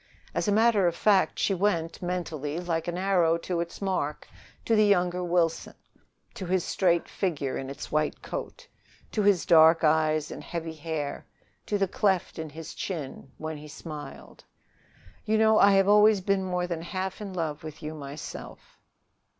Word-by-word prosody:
As - - -1
a - - +3
matter 215 -3 +4
of 170 - 0
fact, 200 +1 +3
she 195 - +1
went 175 -4 -1
mentally, 165 -4 -3
like 165 -2 -2
an 175 0 -2
arrow 180 -3 +2
to 170 +1 -3
its 170 +3 -5
mark, 165 -6 -2 0.4
to 225 - +3
the 215 -1 +5
younger 180 -2 +2
Wilson 170 -2 0 0.6
to 185 - -6
his 185 -1 +1
straight 175 -3 +1
figure 150 -8 -2
in 135 - -5
its 140 +1 -8
white 155 0 -1
coat, - - -6 0.4
to 215 - 0
his 200 -4 +3
dark 165 -1 +6
eyes 155 0 +2
and - - -7
heavy 165 -1 -5
hair, 155 -2 -5 0.4
to 205 - 0
the 195 -1 +1
cleft 190 -3 0
in 160 -1 -5
his 160 +2 -9
chin 145 -6 -6
when 155 0 -5
he 150 +1 -10
smiled. 150 0 -9 0.8
"You 220 0 +1
know, 220 0 +5
I 200 0 +6
have 195 0 +4
always 210 0 +6
been 195 0 0
more 180 -1 -1
than 170 -2 -4
half 190 +3 -4
in 200 -2 -5
love 160 -5 -3
with 155 0 -9
you 155 +1 -4
myself..." 145 -1 -9
175 Hz, 175 wpm, -27 LUFS, 155-195 Hz, 0.8 s, dark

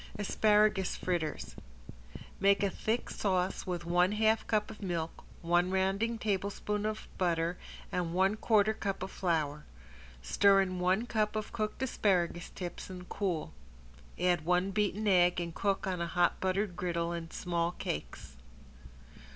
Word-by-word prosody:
~ASPARAGUS 210 -1 +3
FRITTERS~ 170 -4 -3 0.8
Make 200 +1 +4
a 200 - +1
thick 225 +5 -2
sauce 185 -2 -1
with 175 -2 -3
one 180 +3 +3
half 220 +1 +2
cup 215 -1 0
of - - -12
milk, 170 -4 -3 0.2
one 175 +2 +3
rounding 195 +5 0
tablespoon 205 0 -1
of 215 0 -4
butter 170 -1 +1 0.4
and 175 -2 -1
one 190 +3 +3
quarter 215 -1 +3
cup 195 -3 -3
of 190 - -5
flour. 155 -5 -1 0.6
Stir 195 - +5
in 185 -1 -2
one 185 +6 +2
cup 215 -2 0
of 215 0 -4
cooked 215 +2 -2
asparagus 180 -8 0
tips 175 0 -7
and 180 -1 -9
cool. 180 -6 -2 0.7
Add 175 -3 +2
one 180 +3 +2
beaten 210 +1 0
egg 180 -2 +4
and 170 -1 -4
cook 195 +2 0
on 185 -2 -2
a 170 - -1
hot 175 0 +2
buttered 190 0 0
griddle 170 0 -1
in 165 -1 -5
small 170 0 -1
cakes. 65 - -6
185 Hz, 145 wpm, -32 LUFS, 175-210 Hz, 0.8 s, Stir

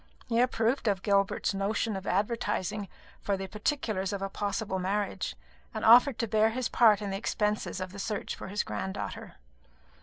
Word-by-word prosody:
He 230 -1 0
approved 245 0 +1
of 195 -2 +1
Gilbert's 200 -1 +1
notion 205 +2 -1
of 190 0 -6
advertising 205 -1 -1 0.3
for 200 -1 0
the 195 - -4
particulars 210 -2 -2
of 200 -1 -3
a 195 - -2
possible 200 -1 -2
marriage, 200 +2 -2 0.4
and 220 - -2
offered 245 +2 +7
to 230 +1 -1
bear 220 +1 +3
his 245 +1 -2
part 215 -3 +5
in 200 - -3
the 195 - -2
expenses 210 0 -1
of 185 0 -5
the 200 - -9
search 210 +1 -3
for - - -8
his 200 +2 -1
granddaughter. 190 +1 -5
205 Hz, 175 wpm, -29 LUFS, 195-225 Hz, 0.4 s, offered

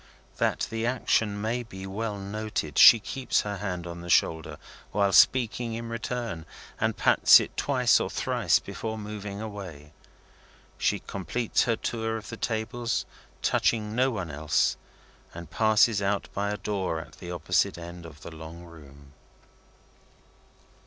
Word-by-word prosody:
That - - +1
the 115 +1 -1
action 110 -4 +1
may 115 +4 -1
be 95 -5 -9
well 105 +2 -4
noted, 100 -6 -3
she 115 - +10
keeps 130 +4 -1
her 105 -1 -4
hand 90 -3 -4
on 85 0 -7
the 85 - -9
shoulder 80 -1 +2 0.3
while 100 -1 +1
speaking 120 -2 +4
in 115 0 -6
return, 115 -7 -4 0.3
and - - 0
pats - - +7
it - - -5
twice 125 -4 +3
or - - -2
thrice - - +1
before 110 -1 -5
moving 105 -1 -6
away. 95 -9 -8 0.9
She - - +2
completes 100 +5 -1
her 115 - +1
tour 110 0 -3
of 105 - -9
the 115 - -7
tables, 115 +2 -2 0.4
touching 105 -2 +1
no 130 +2 +3
one 95 -9 -4
else, 75 +1 +1 0.6
and 85 -2 -9
passes 110 0 +3
out 100 0 -1
by 100 +1 -1
a 105 - -2
door 95 -6 -2
at 80 - -12
the 90 - -8
opposite 85 -1 0
end 85 0 -9
of 75 -2 -14
the - - -9
long 80 +2 -10
room. 70 -4 -15
105 Hz, 150 wpm, -27 LUFS, 85-115 Hz, 0.9 s, she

